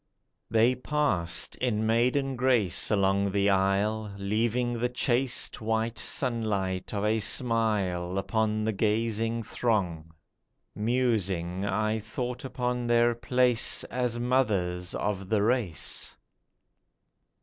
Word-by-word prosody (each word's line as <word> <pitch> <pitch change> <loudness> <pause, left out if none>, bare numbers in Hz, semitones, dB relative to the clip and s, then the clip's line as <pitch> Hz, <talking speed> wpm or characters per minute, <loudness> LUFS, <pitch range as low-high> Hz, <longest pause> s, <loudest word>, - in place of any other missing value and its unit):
They 115 +3 +4
passed 125 - 0
in 110 -4 0
maiden 125 +4 +1
grace 120 -7 +2
along 100 -1 +2
the 100 0 +3
aisle, 100 +3 +1
Leaving 115 +5 0
the 125 +1 0
chaste 125 0 0
white 110 +1 -1
sunlight 105 -7 -2
of 105 -1 -2
a 110 +1 +2
smile 100 -6 0
Upon 110 +1 0
the 110 - +1
gazing 115 +2 0
throng. 90 -9 -1 0.6
Musing 100 -6 0
I 110 +3 0
thought 120 +3 -5
upon 125 -2 -2
their 120 0 +4
place 125 0 +1
as 125 -1 -1
mothers 100 -8 0
of 100 -2 -3
the 105 -2 +2
race. 110 - -1
110 Hz, 105 wpm, -28 LUFS, 100-120 Hz, 0.6 s, They